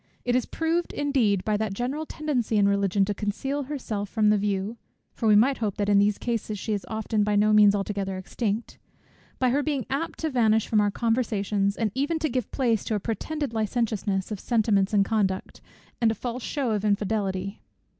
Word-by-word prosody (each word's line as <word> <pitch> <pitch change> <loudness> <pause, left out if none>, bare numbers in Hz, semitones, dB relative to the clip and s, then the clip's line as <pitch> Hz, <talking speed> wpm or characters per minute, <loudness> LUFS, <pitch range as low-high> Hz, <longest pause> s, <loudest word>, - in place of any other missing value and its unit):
It 245 0 +1
is 255 - +1
proved, 330 +2 -1
indeed, 245 -10 +1
by 215 -1 +1
that 210 -2 -2
general 270 +7 -3
tendency 255 -8 -1
in 200 -1 +4
Religion 200 -1 +2
to 205 - -1
conceal 265 +8 -3
herself 225 -8 -4
from 210 -1 +3
the 210 - +4
view, 200 +2 -2 0.4
(for 225 - -2
we 210 - +6
might 260 +6 +4
hope 210 -4 -2
that 205 0 0
in 200 -1 +5
these 205 0 +3
cases 225 -3 -3
she 215 +2 -2
often 220 0 -1
is - - +2
by 210 0 +1
no 210 +1 +4
means 205 -1 +6
altogether 195 -1 -2
extinct) 210 +3 -3 0.6
by 255 -2 +2
her 280 +3 +2
being 285 -4 -1
apt 295 +5 -2
to 320 -1 -1
vanish 220 -4 +3
from 215 -2 +3
our 205 - +2
conversations, 210 -3 0
and 220 -3 0
even 285 +5 0
to 315 -1 -1
give 250 -3 -2
place 235 -6 +1
to 220 - -1
a - - 0
pretended 275 +6 -3
licentiousness 215 -3 -1
of 210 - -3
sentiments 210 -4 +2
and 200 -2 +3
conduct, 195 -4 -1 0.4
and 230 - +4
a 225 - -1
false 245 +3 -4
shew 270 -2 -2
of 210 -2 -1
infidelity. 200 -2 -1
215 Hz, 200 wpm, -26 LUFS, 205-245 Hz, 0.6 s, we